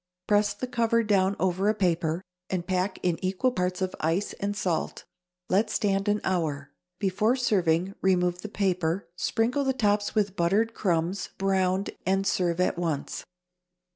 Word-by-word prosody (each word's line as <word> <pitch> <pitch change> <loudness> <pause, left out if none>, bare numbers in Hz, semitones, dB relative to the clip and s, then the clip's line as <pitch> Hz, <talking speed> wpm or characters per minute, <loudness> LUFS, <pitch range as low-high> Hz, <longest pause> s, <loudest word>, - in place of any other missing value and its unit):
Press 205 0 +2
the 230 - -3
cover 230 -2 +1
down 200 -2 +2
over 190 +2 +1
a 215 - +2
paper, 170 -3 0 0.3
and 180 -2 -2
pack 185 +1 -1
in 175 -1 0
equal 190 +7 +1
parts 180 -3 -1
of 185 - -2
ice 165 +6 0
and 205 +1 -2
salt. 180 -5 -2 0.4
Let 205 +4 +2
stand 195 0 0
an 210 0 +2
hour. 155 -6 -1 0.3
Before 205 +5 +1
serving, 185 -7 +1
remove 180 -1 +2
the 215 - -6
paper, 185 -3 0
sprinkle 235 +8 0
the 265 -1 +1
tops 205 -4 +1
with 205 -3 +1
buttered 205 +7 +2
crumbs, 180 0 -1
browned, 190 0 +1
and 195 +1 +1
serve 175 -3 +1
at 180 -1 +1
once. 160 -5 -2
190 Hz, 155 wpm, -27 LUFS, 180-205 Hz, 0.4 s, Press